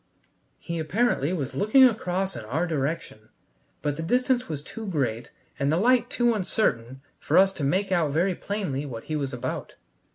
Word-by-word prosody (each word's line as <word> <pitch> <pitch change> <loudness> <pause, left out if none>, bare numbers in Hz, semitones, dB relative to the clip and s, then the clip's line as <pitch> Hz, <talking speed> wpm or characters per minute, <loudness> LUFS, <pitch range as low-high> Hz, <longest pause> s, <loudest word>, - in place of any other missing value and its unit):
He 170 -1 -5
apparently 170 - +1
was 145 -7 -3
looking 215 +6 +5
across 195 -5 +2
in - - -6
our 150 +11 -1
direction, 140 -8 -3 0.5
but 145 -1 -1
the - - -3
distance 250 +7 +1
was 145 -2 -4
too 220 +7 -8
great 120 - -2 0.3
and 140 +1 +1
the 160 - +2
light 245 +6 +3
too 240 -1 +2
uncertain 135 - -1 0.2
for 160 - +1
us 195 +1 +6
to 155 - -5
make 190 +8 +1
out 170 -5 +2
very 175 +6 +2
plainly 180 -8 -3
what 120 -6 -7
he 155 - -4
was 140 -3 -2
about. 125 0 -5
165 Hz, 175 wpm, -26 LUFS, 140-200 Hz, 0.5 s, us